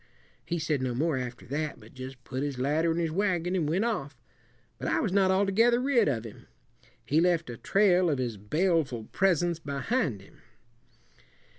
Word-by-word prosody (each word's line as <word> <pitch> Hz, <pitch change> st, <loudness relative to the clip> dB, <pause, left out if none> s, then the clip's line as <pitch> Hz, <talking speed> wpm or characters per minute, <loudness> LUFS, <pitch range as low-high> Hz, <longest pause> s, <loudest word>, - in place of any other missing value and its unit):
He 175 Hz, -, -2 dB
said 155 Hz, -4 st, -1 dB
no 125 Hz, -2 st, -1 dB
more 150 Hz, +2 st, +1 dB
after 125 Hz, -1 st, -6 dB
that, 150 Hz, +4 st, -3 dB
but -, -, -16 dB
just 130 Hz, -1 st, -9 dB
put 130 Hz, +1 st, -4 dB
his 145 Hz, -2 st, -3 dB
ladder 150 Hz, +6 st, +1 dB
in 165 Hz, -, -1 dB
his 165 Hz, -2 st, 0 dB
wagon 180 Hz, -1 st, 0 dB
and 160 Hz, -5 st, 0 dB
went 185 Hz, +8 st, +1 dB
off. 145 Hz, -, -3 dB, 0.6 s
But -, -, -4 dB
I -, -, +1 dB
was 210 Hz, -, 0 dB
not 195 Hz, -1 st, +3 dB
altogether 200 Hz, +5 st, +3 dB
rid 250 Hz, -4 st, +3 dB
of 120 Hz, -6 st, 0 dB
him. 110 Hz, -, -11 dB, 0.6 s
He 155 Hz, +3 st, +2 dB
left 170 Hz, -6 st, +1 dB
a 120 Hz, -, -8 dB
trail 185 Hz, -, +3 dB
of 145 Hz, -, +1 dB
his 125 Hz, -3 st, -2 dB
baleful 150 Hz, -, 0 dB
presence 175 Hz, -3 st, +2 dB
behind 140 Hz, -, -2 dB
him. -, -, -20 dB
160 Hz, 180 wpm, -28 LUFS, 130-185 Hz, 0.6 s, not